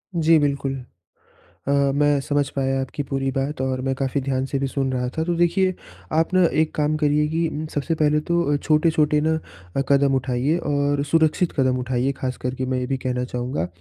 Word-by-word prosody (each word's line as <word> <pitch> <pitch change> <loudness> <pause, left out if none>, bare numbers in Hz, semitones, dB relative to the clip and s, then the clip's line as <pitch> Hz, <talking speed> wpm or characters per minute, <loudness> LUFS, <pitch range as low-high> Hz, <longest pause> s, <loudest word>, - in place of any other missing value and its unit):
जी, 165 0 +4
बिल्कुल। 140 -2 0 0.9
अ, - - +2 0.2
मैं 145 0 +3
समझ 145 -1 0
पाया 135 -1 0
आपकी 135 +2 -4
पूरी 135 0 -2
बात 135 +2 -2
और 130 -1 -1
मैं 135 +1 0
काफ़ी 135 +1 -1
ध्यान 130 0 -1
से 140 - -2
भी 135 - 0
सुन 135 0 -1
रहा 125 -1 -1
था, 160 - +1
तो 175 +1 -1
देखिए, 175 +2 +2 0.4
आप 160 +3 +1
ना 185 0 +5 0.2
एक 160 - -1
काम 150 0 +1
करिए 150 0 +2
कि 165 +1 0
इन 155 0 -4
सबसे 150 +3 -1
पहले 150 0 +3
तो 170 -4 +2
छोटे-छोटे 155 0 +2
ना 160 +1 +2 0.4
अ, - - +2
कदम 140 -1 +4
उठाइए 130 +4 0
और 145 0 +1
सुरक्षित 165 +2 +2
कदम 130 -1 +2
उठाइए 125 +1 0
ख़ास 130 -1 -3
करके 130 +1 -2
मैं 130 0 -1
ये 125 - -2
भी 135 0 -1
कहना 125 -1 -2
चाहूँगा। 125 -4 -3
140 Hz, 200 wpm, -22 LUFS, 130-155 Hz, 0.9 s, ना